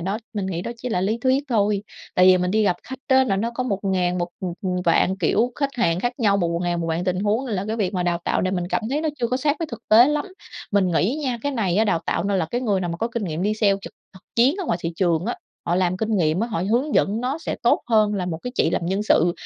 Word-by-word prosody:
đó 195 Hz, +5 st, -2 dB, 0.2 s
mình 200 Hz, -2 st, -2 dB
nghĩ 175 Hz, -2 st, -3 dB
đó 235 Hz, -, -4 dB
chỉ 250 Hz, +2 st, -5 dB
là 180 Hz, -, 0 dB
lý 215 Hz, +5 st, 0 dB
thuyết 260 Hz, +2 st, +1 dB
thôi, 205 Hz, -3 st, +1 dB, 0.3 s
tại 180 Hz, 0 st, +5 dB
vì 185 Hz, -1 st, +7 dB
mình 180 Hz, 0 st, 0 dB
đi 215 Hz, +2 st, +2 dB
gặp 180 Hz, -3 st, +2 dB
khách 265 Hz, 0 st, -8 dB
á 260 Hz, 0 st, +5 dB
là 195 Hz, -6 st, 0 dB
nó 225 Hz, +4 st, -1 dB
có 255 Hz, -, -1 dB
một 200 Hz, -6 st, -1 dB
ngàn 180 Hz, -2 st, 0 dB
một, 175 Hz, 0 st, -1 dB
ừm, 180 Hz, -2 st, -3 dB
ừm, 180 Hz, -1 st, -1 dB
vạn 175 Hz, +2 st, +3 dB
kiểu 215 Hz, +7 st, +1 dB
khách 280 Hz, -1 st, -1 dB
hàng 180 Hz, -8 st, +1 dB
khác 245 Hz, +4 st, 0 dB
nhau, 205 Hz, -4 st, +3 dB
một 175 Hz, -4 st, 0 dB
một 170 Hz, -, -1 dB
ngàn 175 Hz, -1 st, -1 dB
một 165 Hz, -, -2 dB
vạn 165 Hz, +2 st, -1 dB
tình 185 Hz, 0 st, 0 dB
huống, 215 Hz, +6 st, 0 dB
là 200 Hz, -5 st, -2 dB
cái 220 Hz, -, -1 dB
việc 195 Hz, -3 st, -1 dB
mà 180 Hz, -, 0 dB
đào 175 Hz, -1 st, 0 dB
tạo -, -, 0 dB
này 185 Hz, +1 st, 0 dB
mình 175 Hz, -1 st, -2 dB
cảm -, -, -1 dB
thấy 290 Hz, -, 0 dB
nó 315 Hz, -, -1 dB
chưa 240 Hz, -, +1 dB
có 250 Hz, -, 0 dB
sát 290 Hz, +3 st, +1 dB
với 330 Hz, -, -2 dB
thực 235 Hz, -, -8 dB
tế 235 Hz, +5 st, +7 dB
lắm. 300 Hz, +4 st, 0 dB, 0.5 s
Mình 200 Hz, -2 st, +3 dB
nghĩ 205 Hz, -, +1 dB
á 265 Hz, -, 0 dB
nha, 240 Hz, -, -3 dB
cái 285 Hz, -, -1 dB
này 200 Hz, -7 st, 0 dB
á 220 Hz, -, +4 dB
đào 170 Hz, -6 st, +1 dB
tạo -, -, 0 dB
nên 200 Hz, -1 st, +1 dB
là 160 Hz, -, 0 dB
cái 245 Hz, -, -1 dB
người 205 Hz, -6 st, 0 dB
nào 175 Hz, -2 st, -2 dB
mà 170 Hz, -, -4 dB
có 230 Hz, -, -2 dB
kinh 235 Hz, -3 st, -3 dB
nghiệm 165 Hz, 0 st, -3 dB
đi 210 Hz, +1 st, +1 dB
sale 205 Hz, -2 st, +3 dB
trực -, -, -9 dB, 0.2 s
thực 190 Hz, -, -15 dB
chiến 250 Hz, +7 st, +5 dB
ở 385 Hz, -, -3 dB
ngoài 175 Hz, -, 0 dB
thị 165 Hz, 0 st, -2 dB
trường 175 Hz, -2 st, +1 dB
á, -, -, -1 dB, 0.3 s
họ 175 Hz, -, +1 dB
làm 185 Hz, 0 st, +1 dB
kinh 220 Hz, +1 st, -1 dB
nghiệm 165 Hz, 0 st, +1 dB
á, 230 Hz, -, +1 dB
họ 210 Hz, -7 st, -2 dB
hướng 265 Hz, +6 st, +1 dB
dẫn 210 Hz, +4 st, +2 dB
nó 265 Hz, +5 st, -2 dB
sẽ -, -, -4 dB
tốt 240 Hz, -, +3 dB
hơn 215 Hz, -3 st, +3 dB
là 185 Hz, -3 st, -2 dB
một 160 Hz, -2 st, -3 dB
cái 250 Hz, -, -4 dB
chị 165 Hz, -, +2 dB
làm 170 Hz, -, -1 dB
Nhân 195 Hz, +3 st, 0 dB
sự, 175 Hz, -4 st, +3 dB
200 Hz, 315 wpm, -23 LUFS, 180-235 Hz, 0.5 s, vì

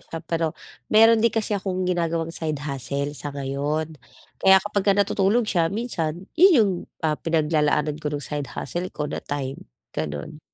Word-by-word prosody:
siya. 165 Hz, 0 st, -8 dB
Pero, 165 Hz, -1 st, -1 dB, 0.3 s
mayro'n 225 Hz, +1 st, +6 dB
din 230 Hz, -, +5 dB
kasi 220 Hz, -1 st, -1 dB
akong 190 Hz, -2 st, -1 dB
ginagawang 165 Hz, -2 st, -1 dB
side 155 Hz, -3 st, -2 dB
hustle 140 Hz, +1 st, -3 dB
sa 145 Hz, 0 st, -5 dB
ngayon, 145 Hz, +2 st, -2 dB, 0.4 s
kaya 190 Hz, 0 st, +7 dB
kapagka 200 Hz, -1 st, +1 dB
natutulog 200 Hz, +3 st, +2 dB
siya 170 Hz, -6 st, +1 dB
minsan 180 Hz, -6 st, -3 dB
'yon 370 Hz, +4 st, +7 dB
'yong, 215 Hz, -6 st, +4 dB, 0.3 s
ah, 155 Hz, -1 st, +1 dB
pinaglalaanan 150 Hz, -2 st, +1 dB
ko 150 Hz, -, -2 dB
no'ng 145 Hz, -1 st, -3 dB
side 145 Hz, -3 st, -4 dB
hustle 175 Hz, +7 st, -3 dB
ko 150 Hz, -, -4 dB
na 145 Hz, -, -4 dB
time, 140 Hz, -, -5 dB, 0.2 s
gano'n. 80 Hz, -, -5 dB
165 Hz, 160 wpm, -24 LUFS, 150-195 Hz, 0.4 s, kaya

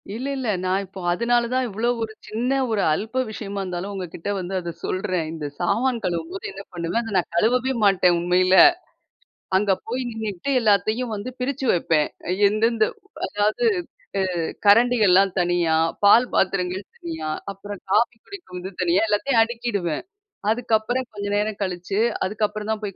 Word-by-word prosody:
இல்ல, 245 Hz, +4 st, -5 dB
இல்ல. 260 Hz, -2 st, -3 dB, 0.2 s
நான் 185 Hz, +2 st, 0 dB
இப்போ 190 Hz, 0 st, -10 dB
அதுனால 235 Hz, +6 st, +2 dB
தான் 255 Hz, 0 st, +1 dB
இவ்ளோ 225 Hz, +3 st, -1 dB
ஒரு 220 Hz, -1 st, -5 dB
சின்ன 240 Hz, +5 st, -1 dB, 0.2 s
ஒரு 210 Hz, -2 st, +1 dB
அல்ப்ப 225 Hz, +10 st, -1 dB
விஷயமா 200 Hz, -2 st, -5 dB
இருந்தாலும் 185 Hz, +1 st, -4 dB
உங்கக்கிட்ட 180 Hz, -1 st, -6 dB
வந்து 185 Hz, +1 st, -5 dB
அத 175 Hz, -1 st, -5 dB
சொல்றேன். 185 Hz, -4 st, -1 dB
இந்த 160 Hz, -2 st, -5 dB
சாமான் 230 Hz, +7 st, +1 dB
கழுவும்போது 175 Hz, +2 st, -3 dB
என்ன 195 Hz, +1 st, -9 dB
பண்ணுவேன், 170 Hz, +6 st, -1 dB
அத 225 Hz, -2 st, -6 dB
நான் 180 Hz, -, -1 dB
கழுவவே 250 Hz, +8 st, +2 dB
மாட்டேன் 180 Hz, -3 st, +4 dB
உண்மையில. 185 Hz, +2 st, +3 dB, 1.0 s
அங்க 200 Hz, +1 st, +2 dB, 0.2 s
போய் 250 Hz, +3 st, -2 dB
நின்னுக்கிட்டு 220 Hz, +1 st, -4 dB
எல்லாத்தையும் 215 Hz, +3 st, +2 dB
வந்து 205 Hz, +4 st, -5 dB
பிரிச்சு 265 Hz, +1 st, -2 dB
வப்பேன். 160 Hz, -3 st, +1 dB, 0.2 s
அ -, -, +1 dB, 0.2 s
எந்தெந்த 220 Hz, +2 st, +2 dB, 0.4 s
அதாவது 210 Hz, -, 0 dB, 0.5 s
அ -, -, +2 dB, 0.4 s
கரண்டிகள்லாம் 205 Hz, -4 st, +5 dB
தனியா, 175 Hz, -2 st, +2 dB, 0.3 s
பால் 230 Hz, +5 st, +6 dB
பாத்திரங்கள் 185 Hz, 0 st, 0 dB
தனியா 160 Hz, -2 st, -5 dB, 0.2 s
அப்புறம் 200 Hz, 0 st, -9 dB
காஃபி 235 Hz, +3 st, +3 dB
குடிக்கிறது 190 Hz, -, -8 dB
தனியா 175 Hz, +1 st, +3 dB
எல்லாத்தையும் 225 Hz, +3 st, +3 dB
அடுக்கிடுவேன். 225 Hz, -8 st, -2 dB, 0.5 s
அதுக்கப்புறம் 235 Hz, +2 st, 0 dB
கொஞ்ச 205 Hz, -1 st, -5 dB
நேரம் 210 Hz, 0 st, 0 dB
கழிச்சு 185 Hz, 0 st, -2 dB, 0.3 s
அதுக்கப்புறம் 210 Hz, +2 st, -2 dB
தான் 220 Hz, -, -1 dB
போய் 200 Hz, -2 st, -4 dB
205 Hz, 145 wpm, -23 LUFS, 180-230 Hz, 1.0 s, பால்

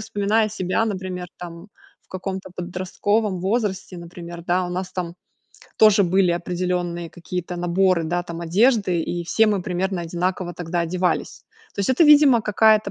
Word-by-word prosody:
вспоминаю 215 Hz, 0 st, 0 dB
себя, 185 Hz, +1 st, 0 dB
например, 185 Hz, -4 st, -4 dB
там 175 Hz, +2 st, -9 dB, 0.3 s
в -, -, -39 dB
каком-то 190 Hz, 0 st, -5 dB
подростковом 185 Hz, +3 st, -1 dB
возрасте, 190 Hz, -2 st, -2 dB
например, 170 Hz, 0 st, -9 dB
да, 180 Hz, +1 st, +1 dB
у -, -, -6 dB
нас 185 Hz, +1 st, -4 dB
там 175 Hz, -2 st, -4 dB, 0.6 s
тоже 215 Hz, -1 st, +6 dB
были 180 Hz, 0 st, +3 dB
определенные 175 Hz, -1 st, -2 dB
какие-то 180 Hz, +1 st, -5 dB
наборы, 175 Hz, 0 st, +2 dB
да, 175 Hz, +2 st, -1 dB
там 170 Hz, -1 st, -7 dB
одежды, 195 Hz, 0 st, +2 dB
и 175 Hz, +1 st, -3 dB
все 220 Hz, +6 st, +3 dB
мы 205 Hz, -4 st, +1 dB
примерно 185 Hz, 0 st, -2 dB
одинаково 175 Hz, +1 st, -2 dB
тогда 175 Hz, 0 st, -3 dB
одевались. 180 Hz, +2 st, -1 dB, 0.3 s
То -, -, -22 dB
есть, 195 Hz, -, -1 dB
это, 260 Hz, +6 st, +4 dB
видимо, 290 Hz, -6 st, +6 dB
какая-то 215 Hz, 0 st, +3 dB
185 Hz, 155 wpm, -22 LUFS, 175-205 Hz, 0.6 s, тоже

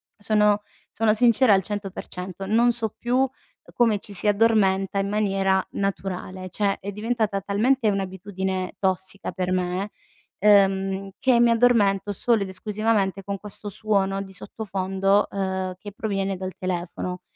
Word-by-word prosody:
sono 210 Hz, 0 st, +2 dB, 0.3 s
sono 220 Hz, -1 st, +2 dB
sincera 235 Hz, 0 st, +5 dB
al 190 Hz, -1 st, +3 dB
100%, 195 Hz, -2 st, -6 dB
non 230 Hz, +4 st, +3 dB
so 225 Hz, -2 st, -2 dB
più, 240 Hz, +1 st, -1 dB
uhm, 265 Hz, 0 st, +3 dB, 0.4 s
come 230 Hz, -3 st, +3 dB
ci 200 Hz, 0 st, -10 dB
si 200 Hz, +2 st, -1 dB
addormenta 200 Hz, -3 st, +3 dB
in 195 Hz, 0 st, -1 dB
maniera 195 Hz, -2 st, +1 dB
naturale. 185 Hz, -1 st, -4 dB
Cioè 200 Hz, -2 st, 0 dB
è 200 Hz, -, -5 dB
diventata 215 Hz, -1 st, -1 dB
talmente 220 Hz, +5 st, +2 dB
un'abitudine 190 Hz, -1 st, -3 dB
tossica 190 Hz, 0 st, -1 dB
per 185 Hz, -1 st, -2 dB
me, 185 Hz, +2 st, -1 dB, 0.5 s
ehm, 195 Hz, -1 st, +3 dB
che 255 Hz, -2 st, +3 dB
mi 240 Hz, 0 st, +5 dB
addormento 215 Hz, -4 st, +3 dB
solo 225 Hz, +1 st, +1 dB
ed 195 Hz, -, -6 dB
esclusivamente 200 Hz, 0 st, -1 dB
con 200 Hz, 0 st, -4 dB
questo 210 Hz, 0 st, -5 dB
suono 195 Hz, -2 st, 0 dB
di 190 Hz, -1 st, -9 dB
sottofondo, 195 Hz, 0 st, 0 dB
uhm, 190 Hz, -1 st, -2 dB
che 205 Hz, -, -8 dB
proviene 195 Hz, -2 st, -2 dB
dal 185 Hz, 0 st, -5 dB
telefono, 180 Hz, 0 st, -4 dB
195 Hz, 140 wpm, -24 LUFS, 190-215 Hz, 0.5 s, sincera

